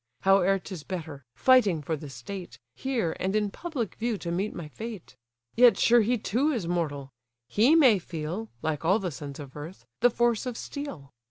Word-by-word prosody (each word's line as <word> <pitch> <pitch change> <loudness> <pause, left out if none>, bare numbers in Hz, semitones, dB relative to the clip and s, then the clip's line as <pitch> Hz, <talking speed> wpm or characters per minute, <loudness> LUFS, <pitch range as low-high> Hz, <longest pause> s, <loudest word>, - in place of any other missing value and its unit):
Howe'er 195 0 +4
'tis 185 -3 -8
better, 155 -5 -6
fighting 215 - +4
for 160 +2 -1
the 150 -1 -8
state, 135 +3 -8 0.2
Here, 240 -12 -1
and 190 +2 -1
in 210 -2 +1
public 280 - -4
view, 230 -1 -2
to 170 -3 -5
meet 195 +5 -1
my 170 -3 -7
fate. 210 - -8 0.4
Yet 245 0 +7
sure 235 0 +5
he 240 +3 +1
too 245 +7 0
is 225 - -2
mortal; 145 -6 -2 0.4
he 245 +10 +4
may 255 -11 +6
feel 175 +6 -5
(Like 155 -1 -1
all 185 +5 +4
the 190 -5 -3
sons 140 0 -8
of 140 -2 -9
earth) 155 +5 -9
the 245 - +5
force 240 0 +1
of 245 -2 -4
steel. 185 - -7
190 Hz, 185 wpm, -27 LUFS, 160-235 Hz, 0.4 s, Yet